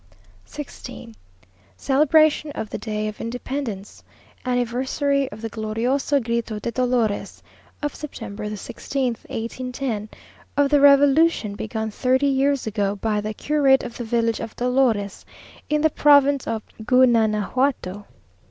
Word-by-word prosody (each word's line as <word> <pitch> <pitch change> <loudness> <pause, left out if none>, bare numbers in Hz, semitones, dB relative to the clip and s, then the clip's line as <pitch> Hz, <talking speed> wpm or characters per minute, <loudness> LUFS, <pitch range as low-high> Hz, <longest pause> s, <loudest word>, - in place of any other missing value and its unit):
16th. 285 - -9 0.6
Celebration 305 - +3
of 220 - -5
the - - -4
Day 215 -1 -3
of 215 - -6
Independence, 230 -3 -5 0.4
Anniversary 260 +3 0
of 220 - -10
the 225 - -3
"Glorioso 235 +7 0
Grito 235 -2 -2
de 235 +3 -4
Dolores," 245 -4 -1 0.4
of 295 - -1
September 210 -8 -7
the 210 - -4
16th, 250 +3 -3
1810; 235 -1 -4 0.5
of 285 0 +3
the 290 -1 +5
revolution 285 -4 +5
begun 220 +1 -4
thirty 260 +5 +1
years 275 0 +1
ago, 205 -2 -1
by 210 0 -1
the 215 +1 -4
curate 280 -1 +3
of 240 - -7
the 240 - -5
village 230 0 0
of 225 - -6
Dolores 245 -5 0 0.5
in 300 0 +1
the 315 0 +3
province 285 -2 +4
of 220 -1 -2 0.2
Gunanajuato. 220 -3 +2
245 Hz, 125 wpm, -23 LUFS, 220-275 Hz, 0.6 s, the